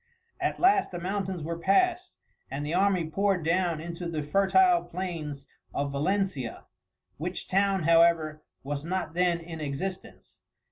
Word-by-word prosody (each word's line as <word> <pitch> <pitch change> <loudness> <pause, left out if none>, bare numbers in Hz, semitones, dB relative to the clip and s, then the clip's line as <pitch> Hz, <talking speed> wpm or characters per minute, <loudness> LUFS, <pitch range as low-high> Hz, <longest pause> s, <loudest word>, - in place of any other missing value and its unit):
At - - -1
last 390 +2 +4
the 175 - -6
mountains 190 -1 -3
were 165 +1 -4
passed, 360 - +2 0.3
and 140 +2 -4
the 150 - -3
army 185 -2 +2
poured 195 0 0
down 170 -1 +1
into 170 +1 -5
the 155 -3 -3
fertile 345 - +4
plains 160 -6 -5 0.3
of 140 0 -1
Valencia, 150 - -1 0.5
which 175 +5 -4
town, 195 -1 +2
however, 165 -2 +4 0.2
was 140 +1 -4
not 175 -1 -3
then 175 -1 +2
in 165 -1 -8
existence. 155 +6 -6
175 Hz, 140 wpm, -28 LUFS, 155-195 Hz, 0.5 s, last